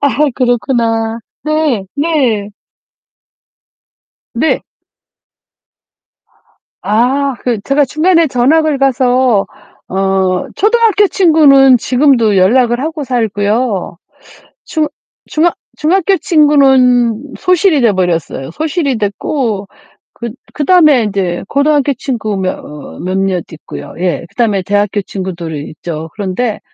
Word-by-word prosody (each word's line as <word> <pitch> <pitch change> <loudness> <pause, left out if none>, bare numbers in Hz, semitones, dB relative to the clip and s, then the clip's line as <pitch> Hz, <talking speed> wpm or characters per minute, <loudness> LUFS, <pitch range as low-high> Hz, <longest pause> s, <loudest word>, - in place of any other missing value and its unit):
아 285 - +3 0.3
그렇구나. 230 -2 0 0.2
네. 305 -9 0
네. 270 -9 0 1.9
네. 270 +7 0 2.2
아 255 +6 +1
그 235 -4 -1
제가 280 +1 +2
중간에 330 +4 +2
전학을 285 +4 +2
가서 255 -4 +2 0.4
어 190 -1 0
초등학교 425 -1 +3
친구는 285 -8 +5
지금도 245 -5 +2
연락을 240 +5 +3
하고 310 0 -4
살고요. 220 -5 -1 0.7
중 310 -2 -1 0.4
중학 330 +2 0 0.2
중학교 375 +4 +2
친구는 265 -5 +3
소실이 365 -5 +2
돼 225 -4 +3
버렸어요. 165 -7 -2
소실이 300 - -2
됐고 205 0 -2 0.5
그 235 -1 -6 0.2
그다음에 305 -5 +4
인제 190 -4 -2
고등학교 285 0 +2
친구 225 -5 -3
며 185 -1 -1
어 150 -1 -11
몇몇 185 -1 -1
있고요. 160 - -9
예. 175 -1 -2
그다음에 210 -6 0
대학교 205 +1 0
친구들이 170 -6 -6
있죠. 160 +1 -7
그런데 210 +2 -3
245 Hz, 220 characters per minute, -13 LUFS, 200-295 Hz, 2.2 s, 친구는